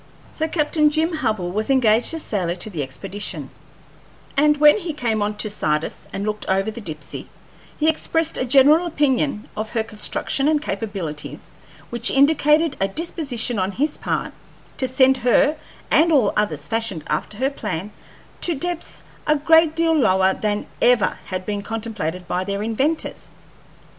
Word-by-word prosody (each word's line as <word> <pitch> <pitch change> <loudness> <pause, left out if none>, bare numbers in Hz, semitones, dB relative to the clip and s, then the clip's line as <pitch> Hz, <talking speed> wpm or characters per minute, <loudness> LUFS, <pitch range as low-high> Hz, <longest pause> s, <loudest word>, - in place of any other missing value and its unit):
So 315 - -2
Captain 305 -1 +2
Jim 320 +3 +1
Hubbell 215 -11 -1
was 215 +5 -2
engaged 240 -4 +3
as 325 - -4
sailor 180 -5 -1
to 185 +4 -6
the 165 -6 -3
expedition; 190 +10 -6 0.8
and 300 +1 +4
when 300 +6 +6
he 340 -5 -4
came 230 -6 -1
on 210 +1 -1
to 215 - -1
Sardis 155 -7 -2
and 200 - -4
looked 210 0 -3
over 195 +3 +1
the 235 - -8
Dipsey 155 -7 -7 0.5
he 310 - +1
expressed 325 0 +1
a - - -1
general 285 +7 +5
opinion 280 -6 0
of 215 +1 -4
her 225 -1 -1
construction 225 +5 -2
and 305 -1 +3
capabilities 195 - -5 0.4
which 235 0 -1
indicated 300 +2 +3
a 195 - +3
disposition 250 - -3
on 190 +1 -1
his 295 +7 0
part - - -2 0.4
to 260 - 0
send 260 +1 +4
her, 255 +5 +3 0.4
and 330 +1 +5
all 275 -8 +3
others 155 -9 -1
fashioned 225 -7 -2
after 155 +7 -3
her 265 +4 0
plan, 185 - -4 0.5
to 340 - 0
depths 350 +3 -4 0.2
a 300 - +4
great 320 +1 +4
deal 330 0 +2
lower 190 -9 +3
than 210 0 -1 0.2
ever 240 -6 +3
had 185 0 -4
been 205 -1 -2
contemplated 205 -6 -4
by 180 +1 -1
their 200 +1 -3
inventors. 270 +9 -2
230 Hz, 160 wpm, -21 LUFS, 200-300 Hz, 0.8 s, when